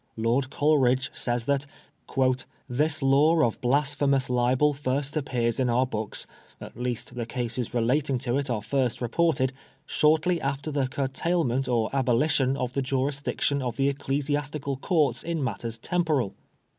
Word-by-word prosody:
Lord 120 +4 +1
Coleridge 130 -4 +2
says 120 -1 -1
that 140 +1 0 0.4
^< 130 -1 +1 0.2
this 145 +4 0
law 150 +5 +4
of 120 +1 0
blasphemous 140 0 +1
libel 125 +4 +3
first 140 +1 -2
appears 120 -6 -1
in 130 -2 +2
our 125 +2 +3
books 110 -4 -3 0.2
— - - -29
^at - - -10
least 125 -1 -3
the 120 -2 -4
cases 120 0 -3
relating 130 +4 +1
to 125 -1 -2
it 140 -1 -3
are 110 -4 -1
first 125 +1 0
reported 130 +1 +1 0.2
— 135 - -38
shortly 160 +3 +2
after 140 +2 -2
the 140 -2 0
curtailment 135 0 -1
or 115 -3 +1
abolition 135 +1 +2
of 125 -1 -3
the 140 - 0
jurisdiction 140 +1 -1
of 125 -2 -3
the 135 0 +3
Ecclesiastical 145 0 -2
Courts 140 - +1
in 165 -3 -2
matters 115 -1 -3
temporal. 150 - 0
135 Hz, 155 wpm, -26 LUFS, 125-145 Hz, 0.4 s, law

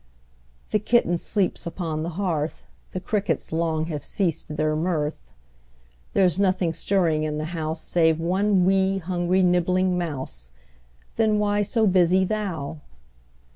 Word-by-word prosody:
The 215 - +3
kitten 215 -4 +2
sleeps 195 -3 -1
upon 165 -2 -3
the 165 - -2
hearth, 165 -6 -2 0.3
The 185 - -3
crickets 200 +2 -2
long 160 -1 0
have 155 -3 -5
ceased 165 -5 -2
their 155 0 +1
mirth; 155 - -2 0.8
There's 185 -2 +3
nothing 185 -4 +2
stirring 165 -4 +1
in 155 -1 -2
the 155 - -3
house 160 -1 -3
Save 160 -2 +2
one 185 +2 +2
'wee', 190 0 +2
hungry, 180 +1 0
nibbling 180 +1 +2
mouse, 130 - -5 0.7
Then 215 -1 +3
why 205 0 +1
so 220 +2 +1
busy 185 -1 +4
thou? 180 -8 -3
175 Hz, 135 wpm, -24 LUFS, 160-195 Hz, 0.8 s, busy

